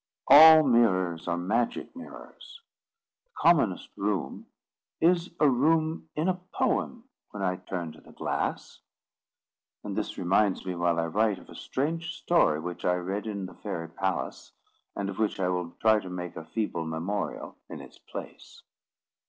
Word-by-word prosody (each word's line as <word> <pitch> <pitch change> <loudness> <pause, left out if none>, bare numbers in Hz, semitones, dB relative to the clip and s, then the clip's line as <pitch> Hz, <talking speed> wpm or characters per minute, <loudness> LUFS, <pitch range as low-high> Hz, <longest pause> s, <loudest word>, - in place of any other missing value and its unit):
All 160 +1 +10
mirrors 95 - +2
are 85 0 0
magic 110 - -1
mirrors. 260 - -12 0.6
The - - -49
commonest 140 - +3
room 100 -8 -3 0.5
is 175 +1 +3
a 150 - +5
room 155 +5 +1
in 155 +3 0
a 185 -1 -1
poem 240 +1 -1 0.2
when 100 -2 -6
I 90 -1 0
turn 90 -3 -5
to - - -16
the - - -17
glass. - - -3 1.0
(And - - -5
this - - -3
reminds 95 +2 +1
me, 90 - -2
while 85 -1 0
I 85 - 0
write, 105 +4 +1
of - - -16
a - - -11
strange 160 +5 -3
story 125 - +2
which 90 +2 -6
I 90 - +2
read 95 +4 -3
in 100 -3 -4
the 95 - -10
fairy 85 -1 -6
palace, 95 +3 -3 0.4
and 100 - -3
of 100 +1 -6
which 110 -2 0
I 90 -1 +1
will 90 -2 -2
try 110 -1 +4
to 95 - -9
make 90 -1 -6
a 80 - -8
feeble 85 -4 -3
memorial 85 +6 -4
in - - -7
its - - -13
place.) - - -10
100 Hz, 160 wpm, -28 LUFS, 90-140 Hz, 1.0 s, All